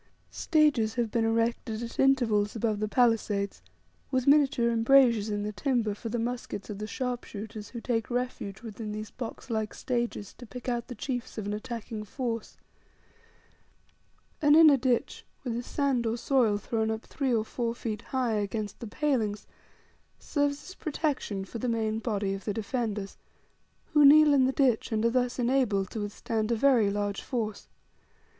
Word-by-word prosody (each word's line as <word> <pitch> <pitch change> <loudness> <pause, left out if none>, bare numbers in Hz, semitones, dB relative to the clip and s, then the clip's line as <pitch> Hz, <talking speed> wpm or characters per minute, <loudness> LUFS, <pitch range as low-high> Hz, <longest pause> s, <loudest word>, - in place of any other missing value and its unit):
Stages 290 -9 +2
have 235 -3 -1
been 230 -1 +1
erected 230 0 0
at 230 - -8
intervals 235 -7 +3
above 220 -2 0
the 215 - 0
palisades 215 -4 +1 0.5
with 255 -2 0
miniature 275 -5 +4
embrasures 230 -2 +4
in 205 -1 -2
the 210 - -2
timber, 230 -2 0
for 225 +3 -6
the 240 - -2
muskets 235 -3 -4
of 200 - -6
the 215 - -4
sharpshooters, 220 -4 -5
who 235 - -7
take 225 -2 -1
refuge 245 -5 -3
within 215 -1 -6
these 215 0 -6
box 245 +1 -7
like 220 -1 -2
stages 240 -5 -3
to 245 - -10
pick 250 +3 -9
out 240 -1 -1
the 245 - -7
chiefs 245 +1 -4
of 215 - -3
an 205 - -2
attacking 220 0 -5
force. 230 +1 -4 1.8
An 295 -1 +6
inner 315 -3 +8
ditch, 250 -2 0 0.2
with 245 -3 -2
the 235 - -2
sand 260 -2 0
or 225 +1 -1
soil 235 -4 +2
thrown 220 +1 -1
up 220 0 -3
three 275 -3 -2
or 220 -2 +1
four 235 0 -2
feet 215 -3 -4
high 255 -3 -1
against 210 0 -3
the 235 - -6
palings, 220 -6 -1 0.7
serves 285 -1 -1
as 375 - -8
protection 285 - -2
for 230 +5 -7
the 250 - -1
main 220 -1 0
body 205 -4 -1
of 195 0 -7
the 205 - -2
defenders, 215 -2 -3 0.8
who 295 -1 +6
kneel 300 +1 +8
in 265 -2 +5
the 260 - +2
ditch, 260 -5 +1
and 220 0 +1
are 230 - +3
thus 250 0 0
enabled 240 -6 +1
to 220 - -4
withstand 215 +2 -2
a - - +3
very 235 -4 +4
large 205 0 -2
force. 220 -5 -4
230 Hz, 170 wpm, -28 LUFS, 215-255 Hz, 1.8 s, inner